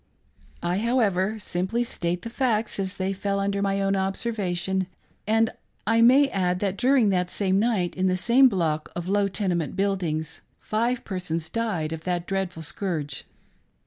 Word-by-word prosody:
I, 175 +2 0
however, 220 -4 +1
simply 195 +4 -1
state 175 -6 -3
the 230 - -6
facts 230 -5 0
as 195 0 -2
they 190 +1 -1
fell 200 +1 -1
under 200 0 0
my 195 0 +1
own 195 0 +1
observation; 190 -2 -1 0.4
and 225 +1 +3 0.3
I 225 0 +3
may 260 +5 +7
add 180 -4 0
that, 195 -1 -1
during 255 -2 +3
that 180 -2 +1
same 195 0 +1
night, 205 -6 +1
in 185 0 +1
the 185 0 +1
same 250 +7 +5
block 160 -7 -1
of 175 0 -4
low 200 +1 +2
tenement 185 -5 -1
buildings, 180 -6 -1 0.2
five 235 +3 -1
persons 170 -4 -3
died 195 -9 -1
of 160 0 -6
that 175 -1 -1
dreadful 185 -4 -3
scourge. 155 -5 -3
195 Hz, 160 wpm, -25 LUFS, 180-220 Hz, 0.4 s, may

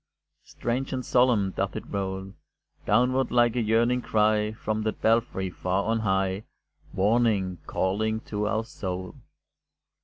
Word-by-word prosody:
Strange 130 +3 -3
and 130 -1 -3
solemn 120 -6 +3
doth - - -2
it - - -4
roll 95 -1 -4 0.5
Downward 125 +4 +3
like 120 -1 +3
a 125 - +1
yearning 115 +3 +2
cry, 105 -1 +2
From 110 0 -3
that 110 0 -2
belfry 110 -5 +1
far 90 +3 -1
on 115 +1 0
high, 95 -1 0 0.5
Warning, 100 -3 +1
calling 110 +4 0
to 105 -1 -3
our 110 +1 0
soul. 95 -4 -5
110 Hz, 130 wpm, -26 LUFS, 95-115 Hz, 0.5 s, solemn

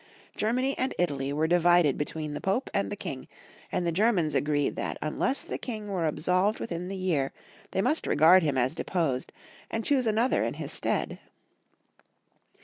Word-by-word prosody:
Germany 255 +5 0
and 260 - -1
Italy 140 -6 0
were 150 +2 +1
divided 175 -3 +4
between 150 0 -4
the - - -5
Pope 195 +7 -1
and - - 0
the - - -2
King, - - -6 0.4
and 180 - -1
the 170 - +1
Germans 180 -4 +2
agreed 145 -1 +1
that - - -3
unless 205 - -1
the - - -5
King 215 -4 -5
were 180 -5 0
absolved 180 +7 +1
within 175 -4 -4
the 195 - -4
year 170 -8 0 0.4
they 190 - 0
must 310 - +1
regard 165 +5 +6
him 145 -5 0
as 125 +2 +1
deposed, 160 -7 -1 0.4
and 225 0 -3
choose 265 -4 +2
another 225 +4 +2
in - - -2
his - - -5
stead. - - -1
175 Hz, 170 wpm, -28 LUFS, 150-215 Hz, 0.4 s, regard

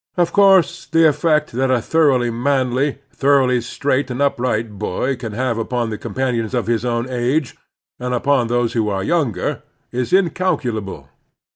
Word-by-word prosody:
Of 175 -1 +1
course 190 -3 +4
the 165 0 +4
effect 150 0 +1
that 130 +3 0
a 130 -1 +3
thoroughly 130 -3 +2
manly, 130 +2 0 0.2
thoroughly 135 -3 +2
straight 135 +3 -1
and 125 +1 -4
upright 115 -6 -1
boy 125 +6 -1
can 115 -3 -7
have 120 0 -1
upon 120 0 -2
the 105 - -4
companions 120 0 -2
of 120 - 0
his 115 0 0
own 120 0 -1
age, 130 +3 -1 0.4
and 125 0 -3
upon 125 0 +1
those 120 0 0
who 110 -3 0
are 95 -1 -2
yoimger, 120 - -1 0.3
is 125 -1 -3
incalculable. 145 - 0
125 Hz, 155 wpm, -19 LUFS, 115-145 Hz, 0.4 s, course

